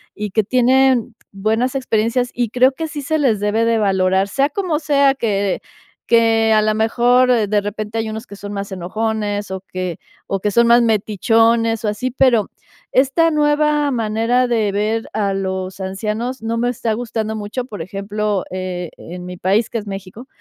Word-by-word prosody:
y 210 -1 -4
que 220 +2 +2
tienen 255 0 +3 0.2
buenas 220 +6 0
experiencias 245 -1 0
y 240 -1 0
creo 250 +3 +4
que 320 +4 -4
sí 300 -1 -6
se 315 +3 -1
les 230 -8 +1
debe 210 +2 +1
de 230 0 +2
valorar. 190 -1 +2
Sea 275 +6 +2
como 340 -2 -1
sea 280 -3 +3
que 200 -6 -1 0.5
que 225 -1 +4
a 215 - +4
la 215 0 +1
mejor 245 +3 +3 0.2
de 205 0 +1
repente 210 +2 -5
hay 220 -1 -1
unos 220 +2 -6
que 200 - -10
son 205 0 -8
más 200 0 -4
enojones 205 +2 -2
o 190 0 -4
que 185 -3 -5 0.3
o 195 - -1
que 210 - 0
son 235 +3 +4
más 235 +1 +6
metichones 225 +1 +2
o - - +1
así, 255 +5 -3
pero 245 -4 +3 0.4
esta 280 +6 +3
nueva 295 -1 +2
manera 230 +1 +1
de 225 -4 +1
ver 215 +3 -1
a 200 -2 0
los 190 -1 -3
ancianos 215 +6 -3
no 225 +1 -2
me 240 +1 0
está 235 -2 -2
gustando 220 -1 -3
mucho, 210 +4 -4
por 210 -8 -8
ejemplo, 200 +2 -2
eh, 180 -2 -4
en 180 +1 -9
mi 180 0 -7
país 200 +6 +1
que - - -3
es 210 -2 -6
México, 195 +5 -8
220 Hz, 180 wpm, -19 LUFS, 200-245 Hz, 0.5 s, más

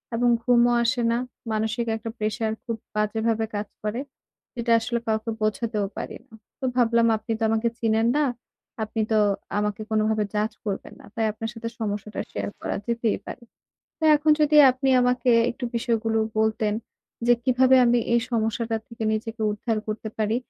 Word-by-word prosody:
এবং 240 +1 +2
ঘুমও 240 0 +4
আসে 235 +1 +1
না। 235 - +1 0.3
মানসিক 220 +2 -1
একটা 225 +1 -6
প্রেশার 215 +1 -1
খুব 230 -2 -3 0.2
বাজেভাবে 220 +1 0
কাজ 205 0 -3 0.2
করে। 215 +3 -2 0.6
যেটা 235 -1 -1
আসলে 235 +1 -2
কাউকে 220 +1 0
বোঝাতেও 215 -1 0
পারি - - -5
না। - - -25 0.3
তো 265 - -3
ভাবলাম 235 -1 +3
আপনি 225 - -7
তো - - -1
আমাকে 225 +1 +1
চিনেন 225 0 +2
না, 300 - +3 0.6
আপনি 220 +1 -2
তো 215 - +4 0.4
আমাকে 210 +1 -2
কোনোভাবে 215 0 +2
জাজ 210 +2 +1
করবেন 200 -2 -4
না। - - -14
তাই 225 - +1
আপনার 225 +1 -5
সাথে 230 0 -5
সমস্যাটা 210 -1 -3
শেয়ার - - -3
করা - - -3
যেতেই 235 -2 0
পারে। 245 - -8 0.6
তো 320 - -3
এখন 300 +1 +2
যদি 300 0 +4
আপনি 260 +1 -1
আমাকে 250 0 +2 0.2
একটু 245 +1 -6
বিষয়গুলো 225 -1 0 0.2
বলতেন 220 -1 +1 0.5
যে 240 - +6
কীভাবে 260 0 +5
আমি 240 0 +4 0.2
এই 235 - +4
সমস্যাটা 225 0 0
থেকে 230 -1 -8
নিজেকে 220 +1 -3
উদ্ধার 215 +2 -2
করতে 215 +1 -3
পারি? 215 +1 +1
225 Hz, 165 wpm, -25 LUFS, 215-235 Hz, 0.6 s, যে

